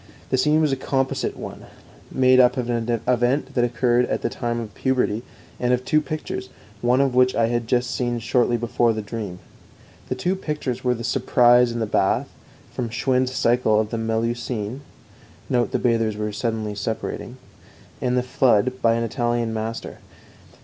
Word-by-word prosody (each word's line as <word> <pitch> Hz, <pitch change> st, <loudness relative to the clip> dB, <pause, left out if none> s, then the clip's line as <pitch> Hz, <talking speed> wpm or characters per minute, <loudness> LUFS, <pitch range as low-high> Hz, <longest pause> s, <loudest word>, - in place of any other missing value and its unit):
The 130 Hz, -, +3 dB
scene 150 Hz, +3 st, +3 dB
was 155 Hz, -2 st, +2 dB
a -, -, +2 dB
composite 135 Hz, 0 st, -1 dB
one, -, -, -8 dB, 0.4 s
made 130 Hz, 0 st, +4 dB
up 125 Hz, 0 st, +6 dB
out -, -, +2 dB
of 120 Hz, -, -6 dB
an 115 Hz, -1 st, -1 dB
event 125 Hz, +3 st, +1 dB
that 120 Hz, -, +2 dB
occurred 120 Hz, 0 st, +2 dB
at -, -, -2 dB
the -, -, +1 dB
time 120 Hz, 0 st, -3 dB
of 110 Hz, -3 st, -7 dB
puberty, 125 Hz, -4 st, 0 dB, 0.4 s
and 125 Hz, 0 st, +2 dB
of 125 Hz, +1 st, -1 dB
two 155 Hz, -, +3 dB
pictures, 150 Hz, -3 st, -5 dB, 0.3 s
one 125 Hz, +2 st, +3 dB
of 135 Hz, -2 st, +1 dB
which 125 Hz, 0 st, +4 dB
I 115 Hz, -1 st, +2 dB
had 120 Hz, -1 st, -2 dB
seen 120 Hz, -1 st, -2 dB
just 115 Hz, 0 st, -7 dB
shortly 120 Hz, -1 st, +2 dB
before 120 Hz, 0 st, +1 dB
the 110 Hz, -1 st, -4 dB
dream. 105 Hz, -4 st, -5 dB, 0.7 s
The -, -, -1 dB
two 180 Hz, +2 st, 0 dB
pictures 150 Hz, -8 st, -4 dB
were 125 Hz, -1 st, +2 dB
The 115 Hz, -, -7 dB
Surprise 120 Hz, -1 st, +4 dB
in 120 Hz, -, -4 dB
the 115 Hz, -, 0 dB
Bath, 95 Hz, -2 st, +1 dB, 0.4 s
from 120 Hz, -2 st, -3 dB
Schwind's 130 Hz, +2 st, 0 dB
Cycle 115 Hz, -3 st, +3 dB
of 110 Hz, -1 st, -1 dB
the 115 Hz, -, -2 dB
Melusine 115 Hz, +1 st, -2 dB, 0.7 s
(note 120 Hz, -3 st, +2 dB
the -, -, +1 dB
bathers 110 Hz, -3 st, 0 dB
suddenly 110 Hz, -2 st, -2 dB
separating), 105 Hz, +2 st, -4 dB, 0.6 s
and 125 Hz, 0 st, +1 dB
The 125 Hz, -, +2 dB
Flood, 130 Hz, -1 st, +2 dB
by 115 Hz, 0 st, +4 dB
an 115 Hz, -, 0 dB
Italian 120 Hz, 0 st, -1 dB
master. 110 Hz, +1 st, -5 dB
120 Hz, 175 wpm, -23 LUFS, 115-130 Hz, 0.7 s, up